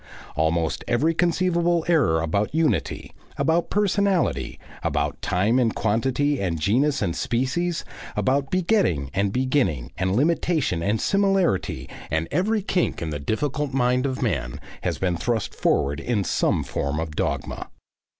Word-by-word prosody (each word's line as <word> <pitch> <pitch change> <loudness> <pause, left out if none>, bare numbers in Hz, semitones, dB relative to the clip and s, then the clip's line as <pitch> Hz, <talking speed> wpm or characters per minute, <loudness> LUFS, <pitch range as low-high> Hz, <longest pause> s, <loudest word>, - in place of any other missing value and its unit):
Almost 80 +1 0
every 145 +8 +2
conceivable 170 0 +1
error 135 - +3
about 100 - -1
unity, 125 - 0 0.2
about 165 +2 +1
personality, 200 -3 +1 0.2
about 75 0 -1
time 105 +8 +2
and 115 -3 +1
quantity 130 +5 +1
and 85 -4 -1
genus 130 - +2
and 85 - -1
species, 155 +8 -1 0.3
about 135 +1 +1
begetting 170 - +1
and 100 +1 +1
beginning 125 - 0
and 95 +1 +1
limitation 155 - +1
and 105 +5 0
similarity 195 - +1 0.2
and 80 +2 0
every 210 +3 +1
kink 185 -2 0
in 80 -2 -3
the 75 - -3
difficult 135 - -2
mind 125 +1 +2
of 130 -1 -3
man, - - -2 0.2
has - - -1
been 90 -2 0
thrust 115 +2 -1
forward 70 +1 +1
in 115 -5 0
some - - +1
form 70 +2 -2
of 80 -2 -4
dogma. - - -3
125 Hz, 140 wpm, -24 LUFS, -, 0.3 s, error